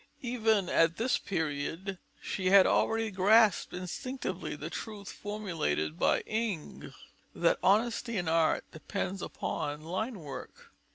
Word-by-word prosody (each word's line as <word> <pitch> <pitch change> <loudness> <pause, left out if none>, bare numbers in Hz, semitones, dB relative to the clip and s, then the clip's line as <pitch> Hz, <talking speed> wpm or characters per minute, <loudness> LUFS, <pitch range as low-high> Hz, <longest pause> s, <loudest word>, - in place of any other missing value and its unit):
Even 220 -5 +2
at 165 0 +3
this 245 +3 +1
period 165 +2 -3 0.2
she 185 - -2
had 195 0 +8
already 225 -1 +2
grasped 205 +2 +4
instinctively 185 +9 -4
the - - -6
truth 210 -3 -6
formulated 165 - -2
by - - +3
Ingres, 215 -7 -3 0.4
that - - +2
"honesty 230 +3 +2
in 175 -3 -1
art 160 0 +2
depends 190 +3 -4
upon 145 +1 -3
line 195 +9 -3
work." 145 -3 -9
195 Hz, 120 wpm, -31 LUFS, 165-220 Hz, 0.4 s, had